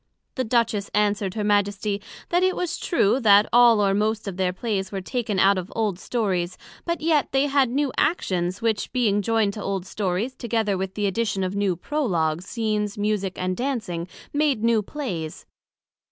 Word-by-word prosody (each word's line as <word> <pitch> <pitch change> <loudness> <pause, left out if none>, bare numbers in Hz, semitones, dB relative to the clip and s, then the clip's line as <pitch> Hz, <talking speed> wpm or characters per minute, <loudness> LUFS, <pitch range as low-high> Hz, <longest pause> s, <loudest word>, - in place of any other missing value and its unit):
The 260 - -1
Duchess 225 -4 0
answered 205 -2 +1
Her 215 - -1
Majesty, 205 0 0 0.3
That 350 +1 +2
it 370 0 +2
was 355 -1 -2
true, 260 - +2
that 205 -3 +6
all 240 -2 +7
or 195 - +2
most 215 +1 0
of 195 - -4
their 185 -1 0
Plays 195 -1 -3
were 195 - -3
taken 215 +1 -2
out 195 +1 +4
of 185 +2 -8
old 210 -5 -1
Stories; 185 -8 -1 0.3
but 340 -1 -2
yet 310 -3 +2
they 270 +1 +2
had 275 -3 +2
new 275 +1 0
Actions, 185 - 0
which 225 -2 0
being 215 -5 +2
joined 220 -1 +1
to 210 - -6
old 195 -2 -2
Stories, 200 +5 -2
together 225 -5 -1
with 190 0 -4
the 210 - -1
addition 200 -1 0
of 185 +1 -2
new 200 -3 +1
Prologues, 175 - -1
Scenes, 210 -3 -2
Musick 205 -2 -1
and 185 0 -1
Dancing, 215 -10 -3 0.3
made 290 -6 +1
new 230 -2 +3
Plays. 190 - -5
210 Hz, 180 wpm, -24 LUFS, 190-240 Hz, 0.3 s, all